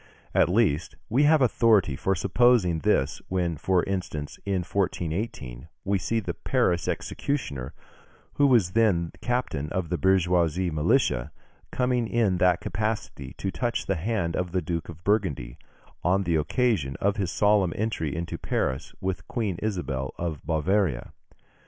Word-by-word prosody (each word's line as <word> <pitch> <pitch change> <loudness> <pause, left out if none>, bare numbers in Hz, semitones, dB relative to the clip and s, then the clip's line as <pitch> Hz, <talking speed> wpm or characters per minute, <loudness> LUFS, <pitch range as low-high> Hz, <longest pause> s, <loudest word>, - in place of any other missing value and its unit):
At - - +4
least, 90 -7 +1
we 135 +6 +3
have 150 -2 +5
authority 110 - +3
for 95 +7 0
supposing 100 -2 +3
this, 70 -2 +1
when, 90 -3 -1
for 90 +4 +1
instance, 90 -6 -4
in 95 -2 0
1418, 85 - -3 0.2
we 100 0 +1
see 115 +5 0
the 105 - -4
Paris 85 -1 0
executioner, 70 - -3 0.6
who 145 - +4
was 115 -10 +4
then 95 -6 +2
captain 120 - -1
of 90 -3 -2
the 90 -2 -1
bourgeois 90 -1 +3 0.3
militia, 75 - +1 0.4
coming 125 -2 +1
in 105 -6 +1
that 90 -1 +3
capacity 105 -9 -3
to 95 - -2
touch 120 +2 -2
the 100 - 0
hand 90 -2 -1
of 90 -1 -2
the 90 - +1
Duke 85 -2 -3
of 85 0 -10
Burgundy, 85 - 0 0.4
on 95 +3 +2
the 85 -3 0
occasion 75 - +1
of 100 +1 +1
his 95 -4 -1
solemn 105 -4 +3
entry 100 -9 -2
into 85 +1 -4
Paris 65 0 -2
with 95 -2 -3
Queen 105 -8 -2
Isabel 80 -11 -3
of 80 -5 -4
Bavaria. 80 -1 0
90 Hz, 145 wpm, -26 LUFS, 80-110 Hz, 0.6 s, have